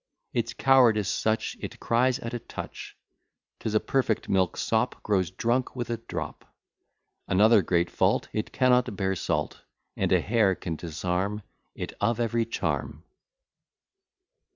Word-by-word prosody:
Its 115 -1 0
cowardice 120 -7 +4
such 110 +3 0
it - - -7
cries 125 +2 +2
at 115 - -6
a 120 - -2
touch; - - -8 0.6
'Tis 110 -1 -3
a - - +6
perfect 125 -4 0
milksop, 105 +5 +1
grows 95 -4 +1
drunk 120 +7 -1
with 120 -2 -3
a 115 - -1
drop, 115 +1 -6 0.8
Another 105 +3 +5
great 85 0 +1
fault, - - +1
it 110 - -2
cannot 125 -4 +3
bear 95 0 0
salt: 75 -4 -2 0.3
And - - -1
a - - +5
hair 105 -3 +2
can 85 -2 -4
disarm 90 +6 -2 0.3
it - - -5
of 115 +3 +1
every 115 0 +1
charm. - - -3
110 Hz, 135 wpm, -27 LUFS, 95-120 Hz, 0.8 s, a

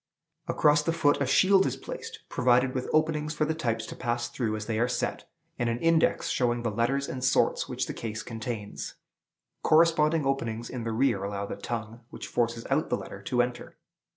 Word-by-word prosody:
Across 150 0 +4
the 165 +2 0
foot 145 -3 +2
a 140 - +1
shield 190 +8 +5
is - - -3
placed, - - -8
provided 125 +1 +3
with 130 -1 -3
openings 155 0 +1
for 155 - +1
the 160 - 0
types 115 -8 -2
to - - -8
pass 120 -1 -2
through 110 -4 -2
as 110 0 -5
they 110 -1 -1
are 120 - +3
set; 125 - -3 0.3
and 120 -1 +1
an 115 - 0
index, 165 +4 +2
showing 120 -1 +1
the 115 - 0
letters 125 +6 0
and 130 -1 -5
sorts 130 - +2
which - - -1
the - - -5
case 110 -1 -5
contains. 115 -2 -5 0.7
Corresponding 160 -1 +4
openings 120 -4 -2
in 120 -2 -5
the 115 - -1
rear 110 -4 +1
allow 100 0 -3
the - - -5
tongue, 115 -1 -5
which - - -8
forces 115 -1 -1
out - - +1
the - - +1
letter, - - -9
to 125 -1 +2
enter. 120 -1 -6
125 Hz, 200 wpm, -28 LUFS, 115-150 Hz, 0.7 s, shield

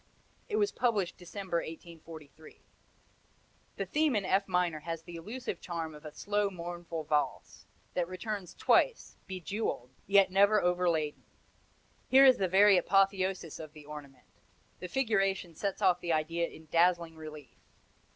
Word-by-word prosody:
It 425 - -1
was 415 -1 +2
published 210 -8 0
December, 180 0 -4
1843. 160 -2 -9 1.1
The - - -3
theme 300 -3 +1
in 205 -2 0
F 195 +1 +1
minor 180 -4 0
has 165 +1 -5
the 175 0 -10
elusive 225 +10 -6
charm 165 -3 -4
of 150 +1 -13
a 155 - -7
slow, 205 +4 -1
mournful 175 -2 -6
valse, 150 -1 -2 0.3
that 175 -2 0
returns 185 0 -5
twice, - - +2
bejewelled, 185 - -4 0.2
yet 195 -1 +5
never 200 +2 +5
overladen. 175 -5 0 0.9
Here 270 +1 +7
is 260 -2 +6
the 190 - +2
very 195 +2 +6
apotheosis 190 -2 +1
of 155 -2 -9
the 150 -2 -13
ornament; 145 -3 -11 0.5
the 180 - -5
figuration 195 -7 0
sets 195 +4 -3
off 180 -1 +4
the 170 -1 0
idea 165 +2 0
in 160 - -13
dazzling 170 -1 +2
relief. 155 -3 -11
180 Hz, 140 wpm, -31 LUFS, 160-200 Hz, 1.1 s, Here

